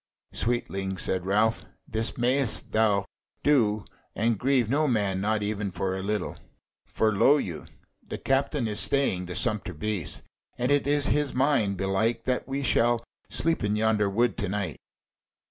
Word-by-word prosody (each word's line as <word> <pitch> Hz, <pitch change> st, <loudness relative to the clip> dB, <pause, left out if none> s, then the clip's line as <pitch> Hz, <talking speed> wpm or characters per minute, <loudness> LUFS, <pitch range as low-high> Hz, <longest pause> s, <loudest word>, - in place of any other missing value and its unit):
"Sweetling," 95 Hz, -5 st, -1 dB
said 95 Hz, 0 st, -2 dB
Ralph, 110 Hz, +3 st, +2 dB, 0.2 s
"this 110 Hz, +1 st, -2 dB
mayst 125 Hz, 0 st, +1 dB
thou 105 Hz, -3 st, +2 dB, 0.4 s
do 110 Hz, -8 st, +3 dB, 0.3 s
and 115 Hz, -1 st, +1 dB
grieve 130 Hz, -2 st, +2 dB
no 150 Hz, +6 st, +2 dB
man, 100 Hz, -6 st, 0 dB
not 105 Hz, +1 st, 0 dB
even 105 Hz, -1 st, -2 dB
for 95 Hz, +1 st, -2 dB
a 95 Hz, -, -4 dB
little. 105 Hz, +2 st, -2 dB, 0.5 s
For 110 Hz, -1 st, +1 dB
lo 135 Hz, +9 st, +5 dB
you! 85 Hz, -, -5 dB, 0.4 s
the -, -, -5 dB
captain 135 Hz, -1 st, 0 dB
is 105 Hz, -1 st, -3 dB
staying 95 Hz, -11 st, +1 dB
the 90 Hz, -, -6 dB
sumpter 105 Hz, -, 0 dB
beasts, 95 Hz, -1 st, -3 dB, 0.3 s
and 125 Hz, +2 st, 0 dB
it 145 Hz, -1 st, +2 dB
is 145 Hz, -1 st, +2 dB
his 145 Hz, -1 st, 0 dB
mind, 130 Hz, -8 st, +2 dB
belike, 110 Hz, +5 st, 0 dB
that 125 Hz, -1 st, -1 dB
we 135 Hz, +1 st, -2 dB
shall 120 Hz, -2 st, +2 dB, 0.3 s
sleep 165 Hz, -5 st, 0 dB
in 105 Hz, 0 st, +1 dB
yonder 105 Hz, -1 st, +2 dB
wood 115 Hz, +1 st, +1 dB
to -, -, -2 dB
night." 100 Hz, -5 st, -3 dB
110 Hz, 160 wpm, -27 LUFS, 100-130 Hz, 0.5 s, lo